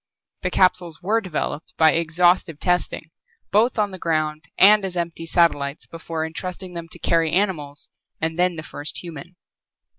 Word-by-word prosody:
The 180 Hz, -, -1 dB
capsules 180 Hz, -3 st, +1 dB
were 220 Hz, +4 st, +2 dB
developed 160 Hz, -4 st, -4 dB
by 160 Hz, -1 st, +6 dB
exhaustive 170 Hz, 0 st, +2 dB
testing 180 Hz, -2 st, -1 dB, 0.4 s
both 225 Hz, +6 st, +3 dB
on 210 Hz, -2 st, +1 dB
the 185 Hz, -, -8 dB
ground 155 Hz, -2 st, -1 dB
and 210 Hz, +1 st, +7 dB
as 185 Hz, -2 st, -3 dB
empty 165 Hz, -1 st, -3 dB
satellites 150 Hz, -4 st, +1 dB
before 165 Hz, -1 st, -5 dB
entrusting 180 Hz, +3 st, -6 dB
them 170 Hz, -1 st, -6 dB
to -, -, -7 dB
carry 165 Hz, -2 st, +1 dB
animals 160 Hz, -7 st, -1 dB, 0.3 s
and 160 Hz, +1 st, -2 dB
then 180 Hz, -1 st, +2 dB
the 155 Hz, -, -7 dB
first 150 Hz, +1 st, -6 dB
human. 170 Hz, +1 st, -9 dB
170 Hz, 155 wpm, -22 LUFS, 160-185 Hz, 0.4 s, and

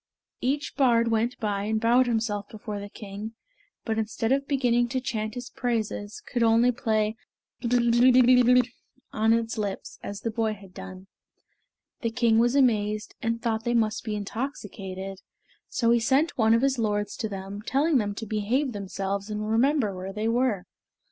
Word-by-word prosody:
Each 285 Hz, +4 st, -1 dB
bard 235 Hz, -4 st, +3 dB
went 230 Hz, +2 st, 0 dB
by 205 Hz, -2 st, -1 dB
and 220 Hz, +1 st, 0 dB
bowed 245 Hz, +3 st, +4 dB
himself 220 Hz, -3 st, -1 dB
before 210 Hz, -1 st, -6 dB
the 200 Hz, 0 st, -7 dB
king, 205 Hz, +2 st, -8 dB, 0.5 s
but 225 Hz, -1 st, -1 dB
instead 220 Hz, +1 st, -1 dB
of 275 Hz, +1 st, +1 dB
beginning 245 Hz, -3 st, +2 dB
to 260 Hz, +2 st, -1 dB
chant 220 Hz, -3 st, -3 dB
his 245 Hz, 0 st, -7 dB
praises, 220 Hz, -4 st, -3 dB
could 240 Hz, -, -2 dB
only 230 Hz, +2 st, +5 dB
play 220 Hz, -2 st, 0 dB, 0.5 s
"Blerwm, 240 Hz, -1 st, +2 dB
Blerwm" 250 Hz, 0 st, +6 dB, 0.5 s
on 220 Hz, +1 st, +1 dB
the 225 Hz, -1 st, +1 dB
lips, 200 Hz, -2 st, -5 dB
as 200 Hz, 0 st, -6 dB
the 230 Hz, -, -2 dB
boy 220 Hz, -1 st, 0 dB
had 195 Hz, -2 st, -15 dB
done. 185 Hz, 0 st, -9 dB, 1.0 s
The 230 Hz, -, 0 dB
king 225 Hz, -1 st, +3 dB
was 240 Hz, +3 st, +3 dB
amazed 215 Hz, -5 st, +2 dB
and 230 Hz, 0 st, -2 dB
thought 225 Hz, -2 st, 0 dB
they 240 Hz, +1 st, 0 dB
must 220 Hz, -2 st, +1 dB
be 215 Hz, -2 st, -3 dB
intoxicated, 195 Hz, -4 st, -5 dB, 0.5 s
so 230 Hz, -2 st, +1 dB
he 235 Hz, -, +4 dB
sent 270 Hz, +8 st, +2 dB
one 225 Hz, -1 st, +4 dB
of 230 Hz, -, +1 dB
his 270 Hz, -2 st, +2 dB
lords 205 Hz, -2 st, -1 dB
to 220 Hz, -, -3 dB
them, 195 Hz, +1 st, -6 dB
telling 280 Hz, +5 st, +2 dB
them 205 Hz, -2 st, -2 dB
to 225 Hz, -, -5 dB
behave 225 Hz, +6 st, 0 dB
themselves 200 Hz, 0 st, -4 dB
and 210 Hz, 0 st, -3 dB
remember 235 Hz, -3 st, +2 dB
where 185 Hz, +1 st, -5 dB
they 215 Hz, +2 st, -2 dB
were. 230 Hz, -5 st, +1 dB
225 Hz, 170 wpm, -26 LUFS, 210-245 Hz, 1.0 s, Blerwm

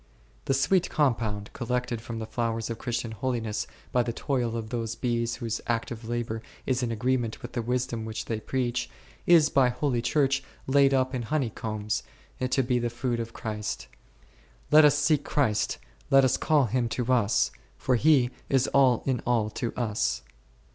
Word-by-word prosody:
The 135 Hz, -, +2 dB
sweet 180 Hz, +7 st, +2 dB
compound, 110 Hz, -8 st, 0 dB
collected 125 Hz, -2 st, -2 dB
from 115 Hz, 0 st, -6 dB
the 110 Hz, -, -4 dB
flowers 115 Hz, 0 st, -2 dB
of 115 Hz, -, -5 dB
Christian 120 Hz, -2 st, -3 dB
holiness 110 Hz, -1 st, -2 dB, 0.2 s
by 125 Hz, -, +3 dB
the 120 Hz, 0 st, -1 dB
toil 120 Hz, -2 st, -1 dB
of 110 Hz, -1 st, -6 dB
those 115 Hz, -2 st, -2 dB
bees 120 Hz, -2 st, -1 dB
whose 115 Hz, -3 st, -3 dB
active 115 Hz, -1 st, -2 dB
labour 115 Hz, -2 st, -2 dB, 0.2 s
is 130 Hz, -1 st, 0 dB
in 120 Hz, -2 st, -1 dB
agreement 120 Hz, 0 st, -1 dB
with 120 Hz, -, -6 dB
the 120 Hz, -, -1 dB
wisdom 120 Hz, -1 st, -2 dB
which 110 Hz, 0 st, -5 dB
they 110 Hz, -2 st, -2 dB
preach, 125 Hz, 0 st, -2 dB, 0.4 s
is 165 Hz, -3 st, +6 dB
by 130 Hz, -2 st, +4 dB
holy 125 Hz, -1 st, 0 dB
Church 135 Hz, +2 st, +2 dB, 0.2 s
laid 135 Hz, 0 st, +4 dB
up 130 Hz, 0 st, +1 dB
in 125 Hz, -, -1 dB
honey 125 Hz, 0 st, -1 dB
combs, 105 Hz, -1 st, -3 dB, 0.4 s
to 130 Hz, +1 st, +1 dB
be 125 Hz, 0 st, +1 dB
the 120 Hz, 0 st, -1 dB
food 120 Hz, 0 st, -2 dB
of 115 Hz, 0 st, -5 dB
Christ. 105 Hz, -1 st, -4 dB, 0.9 s
Let 155 Hz, 0 st, +8 dB
us 145 Hz, 0 st, +5 dB
seek 150 Hz, -1 st, +2 dB
Christ, 110 Hz, -8 st, 0 dB, 0.3 s
let 135 Hz, -1 st, +6 dB
us 130 Hz, -, +3 dB
call 150 Hz, -4 st, +3 dB
Him 120 Hz, +1 st, 0 dB
to 125 Hz, 0 st, +1 dB
us, 115 Hz, -3 st, +2 dB, 0.3 s
for 130 Hz, -, 0 dB
He 130 Hz, -1 st, +4 dB, 0.2 s
is 135 Hz, -2 st, +3 dB
all 130 Hz, -4 st, +4 dB
in 130 Hz, -3 st, +1 dB
all 115 Hz, -3 st, +2 dB
to 115 Hz, -, -3 dB
us. 110 Hz, -, -1 dB
120 Hz, 175 wpm, -27 LUFS, 115-130 Hz, 0.9 s, Let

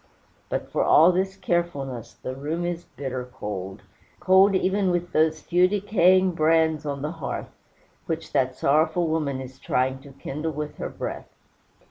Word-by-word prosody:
But -, -, -3 dB
for -, -, +1 dB
all 165 Hz, +4 st, +6 dB
this 190 Hz, +2 st, -1 dB
carefulness, 140 Hz, -, -2 dB
the 130 Hz, -, -6 dB
room 155 Hz, +6 st, -3 dB
is 175 Hz, 0 st, -3 dB
bitter 130 Hz, -1 st, -5 dB
cold 105 Hz, -6 st, -7 dB, 0.4 s
cold 190 Hz, +2 st, +5 dB
even 190 Hz, +1 st, +1 dB
with 175 Hz, 0 st, -1 dB
those 155 Hz, 0 st, +2 dB
few 180 Hz, +1 st, +3 dB
decaying 185 Hz, -2 st, +3 dB
brands 160 Hz, -2 st, +2 dB
on 140 Hz, -1 st, -3 dB
the 150 Hz, -, -2 dB
hearth, 165 Hz, -4 st, -6 dB, 0.5 s
which 165 Hz, 0 st, -4 dB
that 130 Hz, -2 st, +1 dB
sorrowful 160 Hz, +4 st, +2 dB
woman 150 Hz, -4 st, -1 dB
is 130 Hz, 0 st, -9 dB
trying 130 Hz, 0 st, 0 dB
to 140 Hz, +1 st, -14 dB
kindle 150 Hz, +4 st, -4 dB
with 150 Hz, +1 st, -5 dB
her -, -, -4 dB
breath. -, -, -6 dB
160 Hz, 155 wpm, -25 LUFS, 135-175 Hz, 0.5 s, all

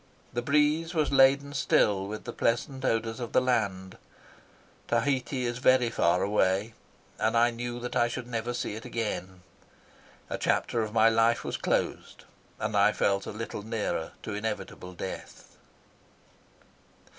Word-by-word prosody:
The 120 Hz, -, -1 dB
breeze 150 Hz, +5 st, +2 dB
was 155 Hz, -3 st, +1 dB
laden 140 Hz, +1 st, +4 dB
still 100 Hz, -7 st, +2 dB
with 105 Hz, +1 st, -6 dB
the -, -, -6 dB
pleasant 130 Hz, +3 st, -1 dB
odours 115 Hz, -1 st, 0 dB
of 120 Hz, -2 st, -5 dB
the -, -, +6 dB
land. 100 Hz, -7 st, -1 dB, 0.9 s
Tahiti 130 Hz, +1 st, 0 dB
is 120 Hz, 0 st, -2 dB
very 130 Hz, -2 st, +4 dB
far 90 Hz, -4 st, +2 dB
away, 100 Hz, +1 st, +1 dB, 0.5 s
and -, -, +2 dB
I 120 Hz, +1 st, +4 dB
knew 120 Hz, +1 st, -5 dB
that 125 Hz, -, -5 dB
I 120 Hz, -, +3 dB
should 125 Hz, +1 st, -5 dB
never 120 Hz, 0 st, -3 dB
see 120 Hz, -, -3 dB
it 110 Hz, -, -7 dB
again. 95 Hz, -5 st, -4 dB, 0.8 s
A -, -, -4 dB
chapter 115 Hz, -, +1 dB
of 110 Hz, -1 st, -3 dB
my 110 Hz, 0 st, +5 dB
life 115 Hz, +1 st, +3 dB
was -, -, -3 dB
closed, -, -, -2 dB, 0.4 s
and -, -, -2 dB
I -, -, +5 dB
felt 100 Hz, -1 st, 0 dB
a -, -, -4 dB
little 110 Hz, 0 st, -5 dB
nearer 110 Hz, 0 st, -3 dB
to 110 Hz, -, -5 dB
inevitable 105 Hz, -3 st, -5 dB
death. 95 Hz, +1 st, -8 dB
115 Hz, 150 wpm, -28 LUFS, 105-125 Hz, 0.9 s, the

